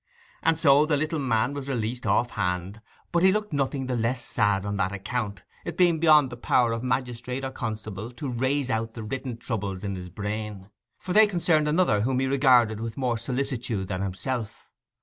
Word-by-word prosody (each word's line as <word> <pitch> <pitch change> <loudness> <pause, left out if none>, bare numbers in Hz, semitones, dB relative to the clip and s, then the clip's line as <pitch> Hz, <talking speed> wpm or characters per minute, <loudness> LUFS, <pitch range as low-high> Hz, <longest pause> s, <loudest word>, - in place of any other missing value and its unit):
And 165 -1 +2
so 150 -1 +5
the 150 -2 +2
little 155 +2 -1
man 125 -1 +1
was 140 -1 -5
released 120 -1 -2
off 120 -1 +2
hand; 90 +4 -2 0.3
but 170 - +2
he 190 +1 +6
looked 210 -3 -2
nothing 135 -1 -1
the 130 -1 -2
less 120 +1 0
sad 105 -1 +1
on 100 0 -2
that 95 -1 0
account, 100 -1 -4 0.2
it 170 - -6
being 175 -3 +4
beyond 150 -5 +5
the 120 - -7
power 120 0 +2
of 115 0 -2
magistrate 125 +1 -2
or 135 - -3
constable 110 -2 -5
to 130 +4 -6
raze 130 +2 0
out 110 0 -2
the 115 - -6
written 125 +2 -4
troubles 100 -5 -4
in 100 -1 -3
his 90 -1 -7
brain, 105 0 -5 0.3
for 180 - -4
they 215 +2 +7
concerned 170 -5 +2
another 150 - +3
whom 125 +3 0
he 135 - +1
regarded 130 -5 +4
with 115 +2 -5
more 125 -4 0
solicitude 125 -5 -2
than 95 -1 -2
himself. 100 +4 -4
120 Hz, 195 wpm, -26 LUFS, 105-140 Hz, 0.3 s, they